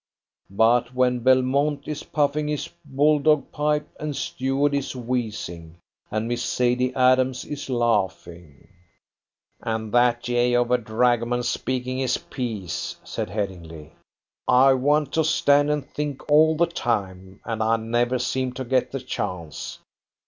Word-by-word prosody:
But 120 +5 +2
when 125 -1 +2
Belmont 130 +4 +2
is 150 -1 -4
puffing 150 0 0
his 150 -1 -2 0.2
bulldog 150 +1 +2
pipe, 150 0 0
and 150 -2 -4
Stuart 135 +3 -1
is 140 -1 -2
wheezing, 110 -9 -4 0.3
and 110 +2 -2
Miss 120 0 -2
Sadie 125 +1 +1
Adams 130 0 +3
is 145 -1 -6
laughing 95 - -2 0.5
" - - -46
"And 110 -1 -3
that 120 0 +3
jay 120 0 +1
of 120 0 +1
a 125 - +4
dragoman 120 +2 +1
speaking 130 +1 -2
his 130 -2 +1
piece," 100 - -5
said - - -4
Headingly; 85 -6 -6 0.5
"I 135 +2 +6
want 145 +2 +1
to 160 - +2
stand 145 -2 +3
and 150 -2 -1
think 145 -2 -5
all 155 +1 +5
the 170 - +4
time, 95 - -3
and 110 -1 -3
I 110 +1 +2
never 120 +3 0
seem 130 +1 -2
to 130 0 -5
get 130 +1 +1
the 135 - -4
chance. 95 - -5
125 Hz, 140 wpm, -24 LUFS, 110-140 Hz, 0.5 s, I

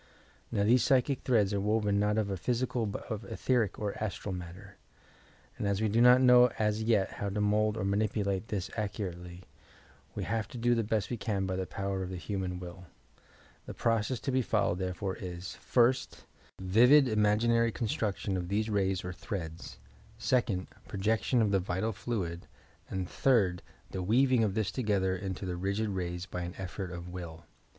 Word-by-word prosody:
Now, 100 - +1
these 120 +4 +5
psychic 135 -1 +2
threads 105 -6 +2
are 100 - +1
woven 105 -1 +1
not 105 +1 +1
of 100 -4 -1
physical 120 0 -1
but 100 - -5
of 110 -1 -2
etherie 115 0 0
or 105 -2 -3
astral 100 -1 -4
matter, 90 +3 -9 0.8
and 100 - -1
as 100 -1 0
we 110 - +1
do 115 +3 +3
not 125 +1 +7
know 125 -1 +8
as 105 0 +1
yet 110 -4 +2
how 100 - -4
to 100 +2 -3
mould 105 +1 +2
or 95 - -2
manipulate 100 0 0
this 95 -3 -3
accurately, 90 -4 -5 0.7
we - - -3
have 110 +1 -2
to 135 - -9
do 120 +1 +2
the 115 -1 +1
best 110 +1 -1
we 120 - -1
can 100 -3 -1
by 95 0 -2
the 95 0 -3
power 95 +3 -3
of 90 - -4
the 95 - -5
human 90 +1 -3
will. 90 0 -9 0.8
The - - -7
process 115 +1 0
to 135 - -2
be 130 0 +2
followed 105 -6 0
therefore 95 +1 -3
is: 90 -3 -6
first, 125 +1 +1 0.3
vivid 125 +10 +6
imaginary 115 +2 +3
construction 105 -4 -2
of 90 -1 -4
these 105 +3 -1
rays 95 -3 0
or 90 - -4
threads; 85 - -6 0.4
second, 115 -4 +1 0.2
projection 110 +4 +1
of 105 - +1
the 100 - +3
vital 95 +4 -2
fluid; 95 -6 -4 0.4
and 95 -1 -3
third, 100 -10 +2 0.3
the 95 - -3
weaving 125 +5 +3
of 100 -3 0
this 105 -3 0
together 100 -6 0
into 95 0 -5
the 90 -1 -3
rigid 100 +4 -1
rays 90 -2 -3
by 90 -2 -5
an 85 +1 -5
effort 95 0 -5
of 85 0 -7
will. 85 -2 -8
100 Hz, 180 wpm, -30 LUFS, 95-115 Hz, 0.8 s, know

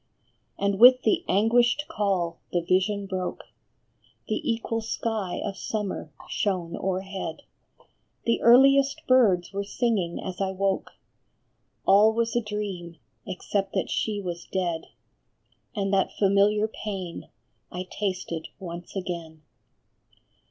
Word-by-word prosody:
And 200 -1 0
with 255 +2 +8
the 355 -2 +2
anguished 235 +7 +3
call 190 -5 -1
the 175 - +1
vision 190 +3 +1
broke, 185 -2 -4 0.8
The - - -1
equal 230 0 -2
sky 220 -4 -2
of 195 - -3
summer 205 -8 -4 0.2
shone 180 -4 -1
o - - -6
erhead; 190 -3 -5 0.8
The 230 - +1
earliest 275 +3 +5
birds 205 -9 +4
were 200 +1 -2
singing 200 -5 -1
as 185 0 -5
I 190 -1 0
woke, 195 0 -1 0.9
All 210 +3 +6
was 230 0 0
a 240 - +3
dream, 200 -6 -5 0.3
except 195 +1 -2
that - - -1
she 215 -2 -1
was 175 -3 -5
dead, 175 -4 -1 0.9
And 200 -1 -1
that 195 -1 +2
familiar 205 +2 +3
pain 195 -5 -6 0.4
I 180 +1 -4
tasted 185 -5 -3
once 175 -1 -8
again. 170 -4 -5
195 Hz, 120 wpm, -26 LUFS, 180-220 Hz, 0.9 s, with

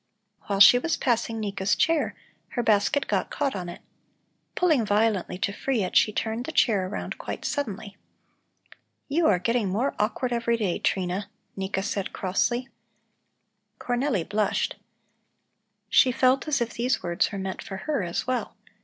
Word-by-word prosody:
While 200 -1 -1
she 205 +5 +9
was 325 +5 -1
passing 230 -2 0
Nika's 200 -1 0
chair, 325 -2 +1 0.4
her 240 - +1
basket 220 +7 +2
got - - 0
caught 280 -5 -1
on 180 -2 -4
it. 175 - -9 0.7
Pulling 315 -9 +3
violently 205 -3 +1
to 200 +1 -1
free 245 -1 -1
it, 180 - -4
she 215 - +5
turned 225 +3 -2
the 320 - -4
chair 205 -11 +2
around 200 - -5
quite - - -6
suddenly. 210 -7 -3 1.1
"You 315 +3 +2
are 185 - +4
getting 230 +2 0
more 230 +9 0
awkward 245 +4 0
every 235 0 +1
day, 200 -6 -1
Trina," 190 +1 -1 0.3
Nika 195 0 -2
said 200 -1 -3
crossly. 240 +7 0 1.1
Cornelli 245 - -1
blushed. 210 0 0 1.1
She 255 +4 +5
felt 260 +3 +2
as 290 -4 +1
if 235 -1 -2
these 250 +3 0
words 175 -1 0
were 200 - -5
meant 190 -1 -4
for 195 - -7
her 300 -7 0
as 170 -2 -3
well. 255 -1 -2
220 Hz, 155 wpm, -26 LUFS, 195-255 Hz, 1.1 s, she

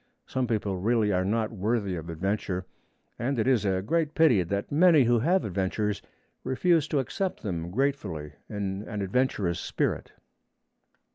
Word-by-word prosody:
Some 130 -1 -1
people 105 -4 -1
really 110 +2 +2
are 90 -1 +2
not 110 +3 0
worthy 105 -2 -1
of 85 0 -6
adventure, 95 +2 -2 0.5
and 130 +3 -1
it 110 - +1
is 125 -5 +3
a 95 -1 +1
great 155 +6 0
pity 155 - +5
that 100 +4 -3
many 160 -1 +6
who 120 0 +3
have 180 +10 +2
adventures 100 +2 -1 0.4
refuse 155 +4 +2
to 150 - -1
accept 185 - -2
them 85 -5 -3
gratefully 95 - -2 0.2
in 100 -2 -3
an 105 -2 -3
adventurous 100 -5 0
spirit. - - -2
105 Hz, 150 wpm, -27 LUFS, 95-130 Hz, 0.5 s, many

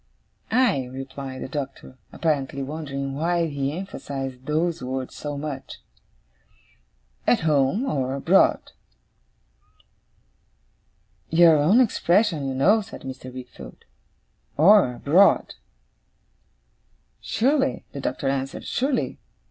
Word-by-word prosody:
'Aye!' 220 - +2
replied 135 0 -7
the - - -5
Doctor, 135 -2 -7
apparently 140 -4 -1
wondering 140 -2 -5
why 170 +4 0
he 140 -3 -2
emphasized 135 -8 -6
those 165 +2 0
words 130 0 -4
so 145 -1 -5
much. 140 -2 -6 1.5
'At 245 - +3
home 155 - +2
or 135 - -1
abroad.' 140 - +3 2.6
'Your 165 -1 +6
own 165 +11 +4
expression, 180 - +2
you 135 - -3
know,' 200 +12 +4
said 200 - -11
Mr. 130 -1 -8
Wickfield. 130 0 -11 0.7
'Or 165 -5 +6
abroad.' 175 +11 +3 1.7
'Surely,' 270 +3 0
the 140 - -7
Doctor 135 +1 -3
answered. 135 0 -3
'Surely. 270 +1 -1
145 Hz, 100 wpm, -24 LUFS, 135-175 Hz, 2.6 s, Your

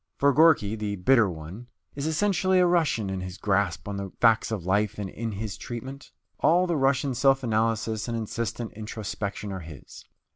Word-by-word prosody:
For 140 0 +3
Gorky, 140 -9 +4
the 105 -2 -3
Bitter 110 +2 +4
One, 85 +8 -8 0.3
is 140 +2 -3
essentially 185 +2 +2
a 180 - +5
Russian 160 - +1
in 95 -1 -3
his 90 +1 -7
grasp 100 0 0
on 100 -1 -4
the 100 -1 -5
facts 115 -2 +4
of 100 -6 -3
life 105 +3 +1
and 105 -2 -3
in 115 +3 -5
his 105 0 -5
treatment. 130 +4 -8 0.3
All 175 +4 +4
the 175 -2 0
Russian 135 -1 +1
self 135 +2 +3
analysis 110 -1 0
and 115 -1 -2
insistent 115 0 -4
introspection 105 -1 -5
are 95 - -4
his. 80 -6 -12
110 Hz, 180 wpm, -26 LUFS, 100-135 Hz, 0.3 s, a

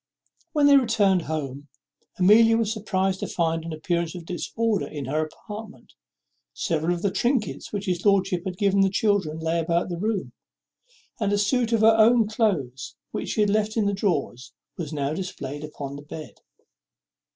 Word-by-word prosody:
When 295 -2 +3
they 285 -1 +8
returned 215 -7 +3
home 145 -2 -4 0.5
Amelia 225 +4 +6
was 220 -1 0
surprized 190 -3 -1
to - - -3
find 165 -1 -1
an 165 - -6
appearance 170 +2 -2
of 175 -2 -8
disorder 215 +5 -1
in 145 -3 -6
her 150 +4 0
apartment. 210 +6 -10 0.6
Several 165 0 0
of 170 - -7
the 200 - +1
trinkets 240 0 -1
which 205 -1 -3
his 180 -3 -1
lordship 195 -3 +2
had 185 -2 -4
given 200 0 +2
the 195 - +4
children 200 -6 +1
lay 160 +1 -1
about 170 +2 0
the 175 -1 -4
room; 210 -1 -2 0.9
and 205 -3 0
a 205 - +2
suit 230 +3 +1
of 225 -2 +2
her 220 0 +6
own 225 0 +5
cloaths, 150 - -1 0.2
which - - -4
she 215 - 0
had 205 -1 +3
left 215 +1 0
in 215 - +2
her 200 - +1
drawers, 165 - -2 0.2
was 160 -4 -5
now 145 -1 -2
displayed 145 -5 -5
upon 140 -2 -7
the - - -9
bed. 150 +1 -10
190 Hz, 175 wpm, -25 LUFS, 160-215 Hz, 0.9 s, they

